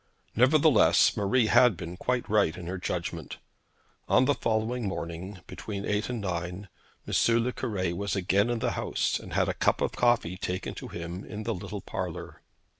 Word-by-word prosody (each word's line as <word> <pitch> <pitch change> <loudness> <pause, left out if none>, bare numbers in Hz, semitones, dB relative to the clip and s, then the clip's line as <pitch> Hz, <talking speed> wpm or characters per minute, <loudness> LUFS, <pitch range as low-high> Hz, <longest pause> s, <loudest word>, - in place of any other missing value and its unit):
Nevertheless 140 +2 +5
Marie 110 +4 +2
had 115 -2 +5
been 85 0 -6
quite 125 +5 -1
right 100 -6 +2
in 90 - -7
her 90 +2 -4
judgment. 85 -3 -4 0.7
On 130 - +5
the 145 - +3
following 115 -1 -1
morning, 85 +1 -5
between 100 -2 -6
eight 105 +2 -1
and 125 -2 -2
nine, 90 0 -4 0.4
M. 115 0 +3
le 125 - 0
Cure 95 -8 -2
was 100 +2 -2
again 100 +3 +2
in 120 - 0
the - - 0
house, - - -1
and - - -10
had - - +2
a - - 0
cup - - +1
of - - 0
coffee 120 -7 +1
taken 90 0 -3
to - - -8
him 85 +3 -6
in 105 0 -7
the 115 +1 -1
little 90 - -6
parlour. - - -6
100 Hz, 180 wpm, -28 LUFS, 90-115 Hz, 0.7 s, Nevertheless